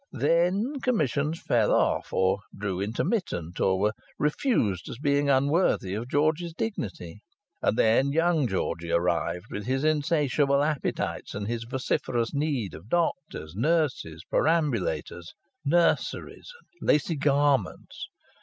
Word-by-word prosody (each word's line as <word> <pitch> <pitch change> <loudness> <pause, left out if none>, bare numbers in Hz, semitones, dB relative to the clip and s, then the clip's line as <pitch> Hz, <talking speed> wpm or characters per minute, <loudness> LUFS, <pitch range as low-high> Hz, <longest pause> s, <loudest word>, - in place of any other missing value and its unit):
Then 180 - +1
commissions 155 - 0
fell 115 - +1
off - - +1
or 95 +1 +2 0.2
grew 100 -2 -3
intermittent, 105 - -2
or 95 -1 +2
were 105 +2 +1 0.2
refused 150 - 0
as - - -7
being 145 0 +1
unworthy 140 - +2
of 115 +4 -4
George's 160 +4 0
dignity. 105 - -5 0.4
And - - +1
then 125 +5 +3
young 165 -2 +2
Georgie 85 -4 -2
arrived, 85 0 0
with 105 +2 -5
his 135 +2 0
insatiable 145 -2 +2
appetites 150 -2 -2
and 100 0 -4
his 115 0 -3
vociferous 120 -1 -1
need 140 - -1
of 85 +8 -11
doctors, 160 - -1
nurses, 130 - 0
perambulators, 115 - 0 0.3
nurseries, 170 - 0 0.3
and - - -6
lacy 150 +3 +3
garments. 140 -6 0
140 Hz, 120 wpm, -27 LUFS, 100-155 Hz, 0.4 s, then